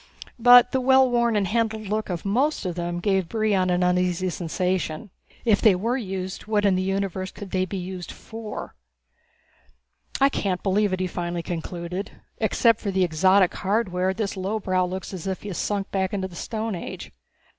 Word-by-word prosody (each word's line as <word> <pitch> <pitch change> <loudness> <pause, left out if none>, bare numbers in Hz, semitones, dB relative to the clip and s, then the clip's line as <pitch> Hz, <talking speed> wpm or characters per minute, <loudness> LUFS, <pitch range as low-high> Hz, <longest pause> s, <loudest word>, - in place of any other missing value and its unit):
But 245 +1 +8
the 260 - +1
well 265 +1 +5
worn 235 -2 +2
and 205 -2 +2
handled 220 +1 0
look 215 +2 -2
of 175 0 -4
most 255 +7 +1
of 180 - -1
them 175 0 -3
gave 190 -2 0
Brion 210 -5 +1
an 180 0 +2
uneasy 180 0 +1
sensation. 180 +1 -2 0.3
If 220 -3 +3
they 215 -5 +6
were 230 +7 -1
used 190 -5 -5
what 210 -1 +1
in 200 - +4
the 185 - +1
universe 190 -1 -2
could 200 -3 -9
they 185 0 +1
be 195 +1 -5
used 180 -1 -6
for? 225 -1 -8 1.5
"I 275 - +6
can't 195 -9 -2
believe 200 +1 +2
it," 185 0 -1
he - - +1
finally 175 -1 -3
concluded. 175 +3 -5 0.3
"Except 230 -2 +3
for 205 - -2
the 190 -1 +2
exotic 185 +3 +4
hardware, 190 -2 0
this 200 +1 -3
lowbrow 185 -1 0
looks 190 +2 -6
as 185 -1 -6
if 190 -1 -3
he 205 - -5
has 180 - -4
sunk 200 -1 -2
back 190 0 -1
into 190 -1 -2
the 180 - -13
Stone 220 +3 -3
Age. 175 - -7
190 Hz, 185 wpm, -24 LUFS, 180-215 Hz, 1.5 s, But